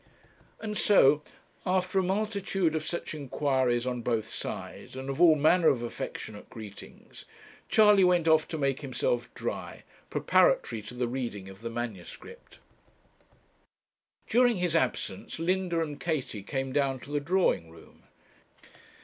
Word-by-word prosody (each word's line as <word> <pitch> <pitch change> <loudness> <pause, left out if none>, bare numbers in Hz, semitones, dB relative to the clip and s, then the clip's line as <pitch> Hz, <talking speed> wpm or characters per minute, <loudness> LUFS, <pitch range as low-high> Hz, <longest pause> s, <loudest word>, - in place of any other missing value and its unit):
And 215 -1 -4
so, 150 -7 +5 0.4
after 185 0 +1
a - - +1
multitude 195 -3 0
of 155 - -1
such 170 - -4
inquiries 130 -4 0
on 125 -1 -2
both 115 -2 -1
sides, 115 - -7
and 130 +1 -4
of 135 - -3
all 165 -3 +8
manner 160 +3 +4
of 120 -5 +3
affectionate 110 -2 -6
greetings, 105 -3 -11 0.4
Charley 210 -3 +6
went 175 -2 +3
off 160 -1 +4
to 160 - -4
make 140 -2 0
himself 125 -3 -1
dry, - - -5 0.3
preparatory 115 -2 +2
to 125 - -7
the 125 0 -1
reading 115 -6 -4
of 95 +2 -13
the 115 - -4
manuscript. 115 -6 -8 1.7
During 245 0 +4
his 180 -3 -1
absence, 125 -9 -1
Linda 175 0 0
and 150 -3 -4
Katie 145 - -2
came 135 +5 -3
down 135 -2 +1
to 145 - -11
the 145 - +1
drawing 165 - +1
room. 80 0 -17
145 Hz, 140 wpm, -29 LUFS, 120-180 Hz, 1.7 s, all